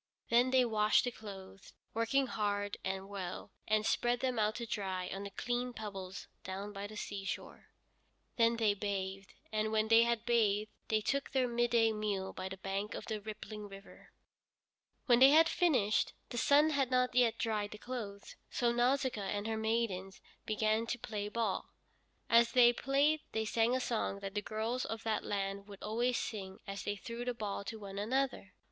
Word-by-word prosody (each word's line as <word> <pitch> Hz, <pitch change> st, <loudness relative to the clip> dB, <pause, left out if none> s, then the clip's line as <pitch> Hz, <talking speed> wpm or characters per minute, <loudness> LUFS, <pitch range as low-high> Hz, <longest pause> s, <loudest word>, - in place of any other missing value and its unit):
Then 240 Hz, +2 st, +5 dB
they 255 Hz, -1 st, +4 dB
washed 215 Hz, -2 st, +3 dB
the 245 Hz, -, -1 dB
clothes, 195 Hz, -4 st, -11 dB, 0.2 s
working 230 Hz, +5 st, +2 dB
hard 205 Hz, -3 st, -1 dB
and 190 Hz, 0 st, -3 dB
well, 190 Hz, -3 st, -6 dB, 0.2 s
and 215 Hz, 0 st, +2 dB
spread 240 Hz, +1 st, +2 dB
them 255 Hz, -3 st, 0 dB
out 215 Hz, 0 st, +2 dB
to 235 Hz, -, -4 dB
dry 190 Hz, -4 st, -3 dB
on 195 Hz, -, -5 dB
the 200 Hz, -, -5 dB
clean 245 Hz, +4 st, -2 dB
pebbles 195 Hz, -4 st, -6 dB, 0.2 s
down 195 Hz, +2 st, -5 dB
by 200 Hz, 0 st, -5 dB
the 215 Hz, +1 st, -10 dB
seashore. 200 Hz, -2 st, -5 dB, 0.7 s
Then 230 Hz, 0 st, +4 dB
they 220 Hz, -3 st, +3 dB
bathed, 195 Hz, -1 st, -4 dB, 0.2 s
and 215 Hz, 0 st, 0 dB
when 220 Hz, 0 st, +1 dB
they 225 Hz, 0 st, +8 dB
had 235 Hz, -1 st, +1 dB
bathed 215 Hz, -3 st, +2 dB, 0.2 s
they 215 Hz, -1 st, +2 dB
took 275 Hz, +5 st, -1 dB
their 260 Hz, -2 st, +1 dB
midday 235 Hz, -1 st, +3 dB
meal 205 Hz, -3 st, -2 dB
by 185 Hz, 0 st, -5 dB
the 190 Hz, -, -7 dB
bank 195 Hz, +2 st, -3 dB
of -, -, -6 dB
the 215 Hz, -2 st, -3 dB
rippling 215 Hz, 0 st, -7 dB
river. 195 Hz, 0 st, -13 dB, 0.9 s
When 245 Hz, -3 st, +5 dB
they 265 Hz, +1 st, +9 dB
had 320 Hz, +3 st, +7 dB
finished, 260 Hz, -, +2 dB, 0.2 s
the 240 Hz, -, -5 dB
sun 295 Hz, +5 st, +5 dB
had 275 Hz, -4 st, +1 dB
not 250 Hz, -1 st, +2 dB
yet 245 Hz, -2 st, +3 dB
dried 210 Hz, -2 st, -1 dB
the 210 Hz, -, -9 dB
clothes, 210 Hz, -4 st, -6 dB
so 240 Hz, -1 st, +1 dB
Nausicaa 250 Hz, -1 st, +1 dB
and 205 Hz, +1 st, -2 dB
her 225 Hz, 0 st, -1 dB
maidens 220 Hz, -4 st, -1 dB, 0.3 s
began 215 Hz, +1 st, +1 dB
to 240 Hz, -, -1 dB
play 210 Hz, -3 st, -4 dB
ball. 230 Hz, +1 st, -1 dB, 0.6 s
As 235 Hz, 0 st, +5 dB
they 240 Hz, -2 st, +7 dB
played 280 Hz, +5 st, +2 dB
they 220 Hz, 0 st, 0 dB
sang 230 Hz, +3 st, +2 dB
a -, -, +1 dB
song 225 Hz, -5 st, -1 dB
that 195 Hz, -1 st, -5 dB
the 205 Hz, -, -1 dB
girls 220 Hz, +4 st, -2 dB
of 225 Hz, 0 st, -5 dB
that 220 Hz, -1 st, 0 dB
land 200 Hz, 0 st, -3 dB
would 200 Hz, -1 st, -11 dB
always 235 Hz, +3 st, +1 dB
sing 190 Hz, -4 st, -4 dB
as 195 Hz, 0 st, -6 dB
they 205 Hz, -, -1 dB
threw 230 Hz, +4 st, -6 dB
the 245 Hz, 0 st, -2 dB
ball 205 Hz, -3 st, -3 dB
to 225 Hz, -, -5 dB
one 200 Hz, -2 st, -7 dB
another. 250 Hz, -2 st, -1 dB
220 Hz, 185 wpm, -34 LUFS, 200-240 Hz, 0.9 s, they